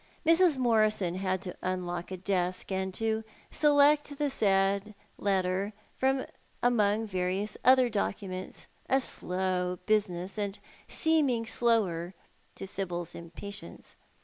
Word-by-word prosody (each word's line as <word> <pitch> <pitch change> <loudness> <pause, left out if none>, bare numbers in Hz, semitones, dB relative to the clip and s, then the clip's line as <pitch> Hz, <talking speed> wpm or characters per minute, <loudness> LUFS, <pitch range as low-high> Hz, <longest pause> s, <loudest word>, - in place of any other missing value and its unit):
Mrs. 330 -2 +5
Morison 215 -7 +2
had 185 0 -2
to 180 - -6
unlock 180 -1 -3
a 190 - -5
desk, 185 0 -1
and 190 0 -1
to 220 0 0 0.3
select 290 -1 +4
the 290 -1 0
said 200 -1 +1 0.2
letter 195 +1 0 0.2
from 265 0 +1 0.4
among 220 -3 +3
various 185 +1 -2
other 255 +1 +6
documents, 195 -4 -4 0.2
a 265 - +4
slow 180 -5 -2
business, 195 -2 0
and 200 -1 -2 0.3
seeming 285 -8 +2
slower 195 -8 +1 0.4
to - - -6
Sibyl's 175 -3 -4
impatience. 195 +5 -9
200 Hz, 115 wpm, -30 LUFS, 185-235 Hz, 0.4 s, other